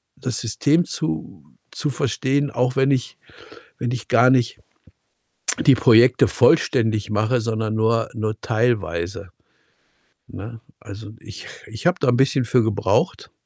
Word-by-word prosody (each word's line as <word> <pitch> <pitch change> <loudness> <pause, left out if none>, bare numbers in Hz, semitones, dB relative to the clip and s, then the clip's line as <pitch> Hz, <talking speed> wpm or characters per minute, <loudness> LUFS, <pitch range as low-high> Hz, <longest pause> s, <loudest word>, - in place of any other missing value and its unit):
das - - -4
System 145 +9 +1
zu 80 -1 -5 0.3
zu 150 - -3
verstehen, 135 +4 -1
auch 125 +1 -1
wenn 135 +1 +2
ich 130 -3 -2 0.6
wenn 120 -1 -3
ich 115 -4 -6
gar 125 +3 +4
nicht 125 -3 +1 1.1
die 135 - +7
Projekte 120 +1 +5
vollständig 115 -6 +2
mache, 110 +4 0
sondern 110 -1 -2
nur 115 +1 +1
nur 110 -1 -4
teilweise, 100 -6 -2 1.0
ne? 110 +4 -9 0.2
Also, 105 -1 -10
ich - - -11 0.2
ich 115 +10 -4
habe 180 - +1
da 135 - +2
'n 120 - +2
bisschen 135 -1 +2
für 120 +1 +2
gebraucht 100 -3 -1
115 Hz, 135 wpm, -21 LUFS, 110-130 Hz, 1.1 s, die